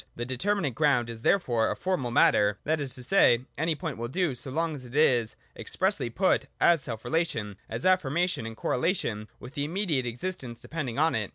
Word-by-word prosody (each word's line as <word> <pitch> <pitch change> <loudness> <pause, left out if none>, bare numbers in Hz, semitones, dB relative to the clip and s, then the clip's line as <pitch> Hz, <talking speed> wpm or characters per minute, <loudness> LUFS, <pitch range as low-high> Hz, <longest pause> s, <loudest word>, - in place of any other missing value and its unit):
The 120 - -4
determinate 145 +4 -1
ground 125 -4 +2
is 115 -1 -9
therefore 120 - +2
a - - -1
formal 180 -10 -1
matter: 105 -3 +4
that 155 0 0
is 135 -3 -4
to 125 - -7
say, 125 -6 +4
any 160 +2 0
point 150 -6 -5
will 120 - -2
do, 175 +2 0
so 125 +2 -6
long 160 +4 -1
as 140 -3 -7
it 125 +1 -11
is 125 -7 +3 0.2
expressly - - 0
put - - +1
as 170 -3 +5
self 115 -4 -6
relation, 115 - -1
as 115 +2 -4
affirmation, 175 -6 +1
in 115 - -7
correlation 125 - -1
with 125 - -10
the 145 -2 -2
immediate 155 -5 -1
existence 125 -1 -4
depending 135 -5 -5
on 160 +2 +3
it. 105 -3 -1
135 Hz, 195 wpm, -28 LUFS, 120-165 Hz, 0.2 s, as